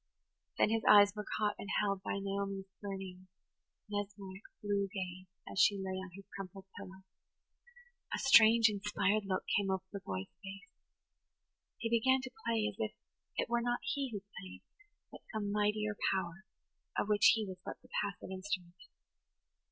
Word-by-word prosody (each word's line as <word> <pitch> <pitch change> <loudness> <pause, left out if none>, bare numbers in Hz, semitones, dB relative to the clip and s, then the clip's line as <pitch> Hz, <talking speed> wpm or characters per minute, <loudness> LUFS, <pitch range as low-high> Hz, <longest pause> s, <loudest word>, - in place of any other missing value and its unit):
Then - - +4
his 225 0 +2
eyes 205 -1 +9
were 210 0 -5
caught 210 -1 +2
and 200 - -6
held 200 -2 0
by 200 - -2
Naomi's 195 0 -2 0.2
burning, 190 -2 -6 0.6
mesmeric, 200 -2 -5 0.2
blue 200 -1 +1
gaze 185 -2 -5 0.2
as - - -3
she 200 - +6
lay 190 -1 -3
on 190 0 -6
her 195 - -10
crumpled 195 0 -7
pillow. 190 -1 -10 1.1
A - - 0
strange, 230 -3 +7
inspired 210 0 +1
look 185 -1 0
came 200 -1 +2
over 190 -1 0
the 200 - -3
boy's 95 - -5
face. 200 +6 -9 1.1
He 230 - -2
began 260 +3 +4
to 260 - -7 0.2
play 225 -2 +2
as 210 -1 -5
if 215 -1 -1 0.4
it - - +1
were 235 0 +1
not 240 0 0
he 280 -2 -1
who 205 -3 -5 0.2
played, 95 0 -10 0.5
but - - -11
some 210 -2 -2
mightier 210 0 +1 0.2
power, 190 +1 -2 0.5
of - - +1
which 210 -1 +6
he 220 -1 -1
was 185 -2 -7
but - - -6
the - - -19
passive 190 -1 -4
instrument. 185 -2 -4
200 Hz, 160 wpm, -34 LUFS, 190-215 Hz, 1.1 s, eyes